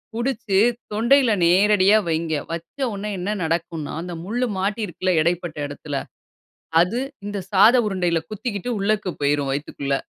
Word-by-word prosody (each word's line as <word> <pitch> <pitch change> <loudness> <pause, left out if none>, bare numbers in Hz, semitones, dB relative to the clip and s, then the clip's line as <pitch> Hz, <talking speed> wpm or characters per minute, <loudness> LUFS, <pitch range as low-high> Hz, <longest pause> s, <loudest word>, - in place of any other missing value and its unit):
புடிச்சு 235 -5 -1 0.3
தொண்டையில 235 +3 +4
நேரடியா 200 +3 +5
வைங்க. 160 0 -1 0.2
வச்ச 170 - -7 0.2
உடனே 210 +2 -4
என்ன 185 +3 -3
நடக்கும்ன்னா, 165 -2 -2
அந்த 175 0 -6
முள்ளு 240 +6 -1
மாட்டி 205 +4 -1
இருக்குல்ல 185 +1 -2
இடைப்பட்ட 170 -1 -1
இடத்தில, 145 0 -7 0.9
அது 190 +8 +1 0.3
இந்த 205 -1 -3
சாத 210 +5 +6
உருண்டையில 175 -4 0
குத்திக்கிட்டு 215 +1 -4
உள்ளக்கு 210 -2 0
போயிரும் 140 -1 +1
வயித்துக்குள்ள." 140 -1 -3
185 Hz, 130 wpm, -22 LUFS, 165-215 Hz, 0.9 s, சாத